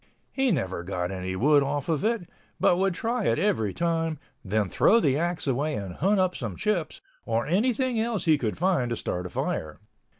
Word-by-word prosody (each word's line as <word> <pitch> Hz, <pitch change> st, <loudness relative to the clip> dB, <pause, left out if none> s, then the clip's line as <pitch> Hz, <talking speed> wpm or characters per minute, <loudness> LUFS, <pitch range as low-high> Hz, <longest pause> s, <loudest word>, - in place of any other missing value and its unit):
He 270 Hz, -1 st, +1 dB
never 95 Hz, -, -1 dB
got 90 Hz, 0 st, -3 dB
any 95 Hz, 0 st, -4 dB
wood 145 Hz, +8 st, +4 dB
off 140 Hz, 0 st, -2 dB
of 165 Hz, 0 st, 0 dB
it, 220 Hz, -5 st, 0 dB, 0.3 s
but 175 Hz, -, +4 dB
would 190 Hz, -1 st, +1 dB
try 230 Hz, +3 st, -1 dB
it 115 Hz, -, +2 dB
every 160 Hz, -, +1 dB
time, 165 Hz, -, -1 dB, 0.3 s
then 105 Hz, +1 st, 0 dB
throw 230 Hz, -, +4 dB
the 140 Hz, -, +2 dB
axe 170 Hz, +3 st, -1 dB
away, 145 Hz, +3 st, 0 dB
and 95 Hz, -3 st, -5 dB
hunt 195 Hz, -, +1 dB
up 185 Hz, -1 st, +1 dB
some 110 Hz, -7 st, -4 dB
chips, 175 Hz, -, -2 dB, 0.2 s
or 115 Hz, +1 st, -1 dB
anything 235 Hz, -, +1 dB
else 225 Hz, -2 st, -1 dB
he 155 Hz, -3 st, +4 dB
could 110 Hz, -5 st, -2 dB
find 175 Hz, -8 st, +1 dB
to 120 Hz, -, -1 dB
start 90 Hz, -4 st, -3 dB
a -, -, -10 dB
fire. 75 Hz, -2 st, -3 dB
155 Hz, 200 wpm, -26 LUFS, -, 0.3 s, wood